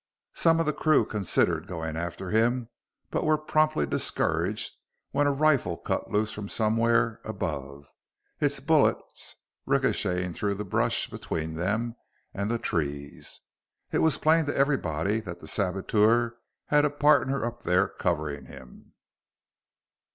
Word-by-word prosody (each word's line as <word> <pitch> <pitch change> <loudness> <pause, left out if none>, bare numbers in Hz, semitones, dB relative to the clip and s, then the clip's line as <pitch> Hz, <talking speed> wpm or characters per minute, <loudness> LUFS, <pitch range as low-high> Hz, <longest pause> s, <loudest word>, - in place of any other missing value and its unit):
Some 165 -1 +3
of 165 - +1
the 150 - +1
crew 155 0 +3
considered 105 -5 0
going 80 -2 -4
after 85 +2 -4
him 115 +2 +2 0.4
but - - 0
were 155 0 +3
promptly 155 - +1
discouraged 70 - -1 0.4
when 145 +1 +2
a - - +3
rifle 140 - +2
cut - - -3
loose 105 +1 0
from 105 -1 -6
somewhere 115 +1 +2
above, 70 -9 -5 0.5
its - - +1
bullets - - +1 0.3
ricocheting 90 -1 +1
through 100 +3 -1
the 105 +1 -5
brush 95 - +1
between 80 0 -4
them 110 +8 -1 0.4
and 100 +1 -2
the 120 - +1
trees. 70 -8 -4 0.5
It - - +1
was 160 -4 +3
plain 160 0 +3
to 145 - -2
everybody 105 - +1
that 90 -6 -7
the 80 - -13
saboteur 105 +6 +2 0.3
had 150 0 +3
a 150 - +3
partner 140 -3 +3
up 120 0 -5
there 90 +2 +2
covering 75 -5 -2
him. 65 -2 -14
105 Hz, 135 wpm, -27 LUFS, 85-135 Hz, 0.5 s, Some